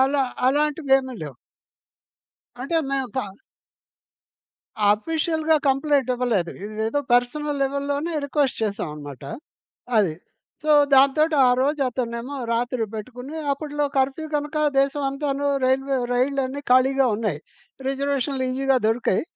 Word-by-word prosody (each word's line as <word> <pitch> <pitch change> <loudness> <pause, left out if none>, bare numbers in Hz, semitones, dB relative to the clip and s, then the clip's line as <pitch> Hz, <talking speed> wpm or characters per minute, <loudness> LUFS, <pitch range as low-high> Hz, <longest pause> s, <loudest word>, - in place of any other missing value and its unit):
అలా 275 +1 +3 0.3
అలాంటివి 295 0 0
ఏమి 260 -1 -6
లేవు. 140 -5 -7 1.3
అంటే 330 +5 -1
మేము 270 -2 -1
ప 260 - +1 1.7
ఆఫీషియల్‌గా 315 +6 0
కంప్లెయింట్ 275 -1 +2
ఇవ్వలేదు. 230 -9 0 0.2
ఇదేదో 220 +6 -2
పర్సనల్ 285 +4 +1
లెవెల్‌లోనే 280 +4 -1
రిక్వెస్ట్ 280 -4 0
చేశామనమాట. 150 - -4 0.8
అది. 185 -7 +2 0.5
సో, 305 - 0 0.2
దాంతోటి 300 +4 +4
ఆ - - +5
రోజు 290 +2 +1
అతన్నేమో 245 +2 -4 0.2
రాత్రి 240 0 0
బెట్టుకుని 250 +7 -7 0.2
అప్పట్లో 295 +1 -2
కర్ఫ్యూ 270 +4 0
గనక 295 +1 -3 0.2
దేశమంతాను 275 0 -1 0.2
రైల్వే 270 +1 +1 0.2
రైళ్లన్నీ 270 +2 0
ఖాళీగా 265 +1 +4
ఉన్నాయి. 205 -9 -2 0.5
రిజర్వేషనులు 275 -1 -1
ఈజీగా 270 +1 +1
దొరికాయి. 225 -4 +1
270 Hz, 105 wpm, -23 LUFS, 245-285 Hz, 1.7 s, ఆ